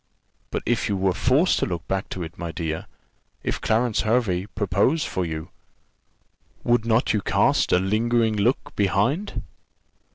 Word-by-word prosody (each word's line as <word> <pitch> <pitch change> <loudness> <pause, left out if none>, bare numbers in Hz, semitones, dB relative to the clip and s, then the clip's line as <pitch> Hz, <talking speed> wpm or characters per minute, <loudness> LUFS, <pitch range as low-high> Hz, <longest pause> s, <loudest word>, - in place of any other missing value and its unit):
"But - - -3
if 120 -2 0
you 100 - 0
were 95 -1 +2
forced 135 - +3
to - - 0
look 85 -3 -4
back 95 0 -2
to 90 - -4
it, 80 0 -8
my 85 -1 -5
dear, 80 -1 -4 0.6
if - - -2
Clarence 115 0 +1
Hervey 105 -5 +1
proposed 105 - +1
for 95 - -2
you, 80 +2 -5 1.1
would 120 -1 +2
not 115 +1 +2
you 105 - +1
cast - - +2
a - - +5
lingering 110 +4 +1
look 110 +5 0
behind?" 120 - 0
105 Hz, 155 wpm, -24 LUFS, 95-120 Hz, 1.1 s, a